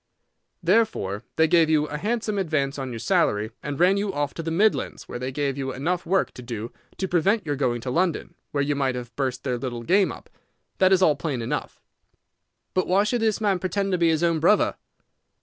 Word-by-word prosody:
Therefore 170 - +1
they 160 0 +4
gave 165 -1 +4
you 150 -1 +3
a 150 0 -5
handsome 215 +1 -1
advance 150 -6 -1
on 135 -1 -4
your 115 - -5
salary, 110 -1 +1
and 145 0 -5
ran 185 +3 +4
you 200 0 -1
off 145 -3 -2
to - - -5
the 165 - -3
Midlands, 205 +7 +1
where 120 - -6
they 130 +1 -3
gave 140 0 -2
you 135 -1 -2
enough 170 +7 -2
work 190 +2 +1
to - - -11
do 115 -1 -6 0.3
to 190 - -2
prevent 190 +4 +2
your 145 -2 -1
going 125 -4 0
to 125 - -4
London, 175 +3 0 0.2
where 140 -1 0
you 145 +1 0
might 135 -2 0
have 120 -1 -7
burst 130 -2 -2
their 125 -3 -1
little 120 -2 -4
game 190 - +3
up. - - -11 0.5
That 185 0 +5
is 190 -1 +5
all 155 -4 +5
plain 140 -3 -3
enough." - - -4 0.9
"But 185 - +1
why 195 +3 +3
should 230 +3 0
this 220 -2 +1
man 200 -4 +1
pretend 195 +2 -1
to 180 - +1
be 170 -1 +4
his 160 +1 +1
own 170 -2 +2
brother?" 190 +7 +3
160 Hz, 220 wpm, -24 LUFS, 130-190 Hz, 0.9 s, That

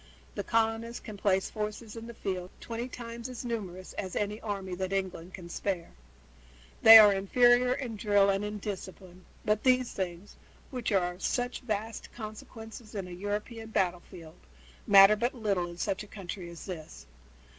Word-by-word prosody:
The - - -3
colonists 230 +1 0
can 215 - -9
place 195 -1 +1
forces 215 +1 -5
in 230 0 -8
the 235 - -9
field 185 -4 -4
twenty 235 +1 -5
times 235 0 -7
as 250 0 -7
numerous 190 -6 -5
as 185 -2 -4
any 210 +1 -2
army 195 -4 -4
that 185 +1 -3
England 190 -2 -3
can 180 -3 -10
spare. 175 0 -3 0.9
They 225 0 +12
are 210 -2 +9
inferior 245 +5 +4
in 240 -5 -5
drill 205 -1 +4
and 195 +1 -1
in 210 0 -4
discipline, 185 -2 -8 0.2
but 210 0 +2
these 255 -1 +3
things, 185 +1 -5 0.3
which 250 -4 -3
are 180 -3 +2
of 180 - -16
such 245 0 -1
vast 220 -2 -4
consequence 220 +1 -9
in 195 -3 -4
a - - -10
European 210 +5 -4
battlefield, 180 -4 -3 0.5
matter 195 +1 +9
but 240 +5 -1
little 200 -6 0
in 170 - -10
such 195 +1 -1
a 210 - -9
country 185 -3 -7
as 170 -1 -10
this. 165 -5 -8
205 Hz, 165 wpm, -30 LUFS, 185-225 Hz, 0.9 s, They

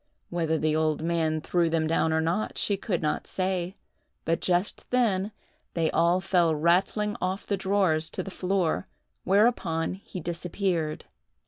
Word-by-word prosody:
Whether 165 -2 0
the 155 0 +1
old 155 -1 +1
man 160 -2 0
threw 170 +1 +1
them 160 -1 +1
down 160 0 +1
or 160 0 +2
not, 170 +7 -1
she 205 - +1
could 190 -3 -2
not 150 - -1
say; 185 -1 -2 0.5
but, 165 0 0
just 180 +2 0
then, 215 -5 +2 0.4
they 165 -2 +1
all 170 +2 +3
fell 175 -4 +2
rattling 190 +6 +2
off 185 +2 -2
the 200 - 0
drawers 190 -5 +1
to - - -4
the 195 - -7
floor, 180 - 0 0.4
whereupon 190 -6 +2
he 190 -1 -8
disappeared. 170 -1 -2
175 Hz, 150 wpm, -27 LUFS, 160-190 Hz, 0.5 s, all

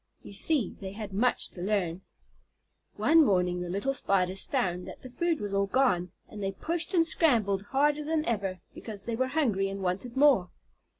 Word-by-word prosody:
You - - -10
see 245 - +2
they 190 -1 -7
had 205 -2 -7
much 240 +5 +1
to 175 - -9
learn. 190 -3 -1 0.9
One 325 0 +5
morning 180 -6 +1
the 175 - -5
little 200 +9 -1
Spiders 190 -6 0
found 180 0 -2
that - - -10
the 255 - -10
food 335 +4 0
was 205 -1 -4
all 200 0 +1
gone, 190 -8 +1 0.2
and 210 - -9
they 195 0 -2
pushed 340 - -3
and 330 -1 +4
scrambled 225 - +2
harder 295 +2 +2
than 310 0 -1
ever, 195 -5 -2
because 210 -3 -8
they 235 - -3
were 260 +3 0
hungry 235 -10 0
and 195 0 -5
wanted 195 +8 -3
more. 265 -11 +4
205 Hz, 185 wpm, -28 LUFS, 190-275 Hz, 0.9 s, One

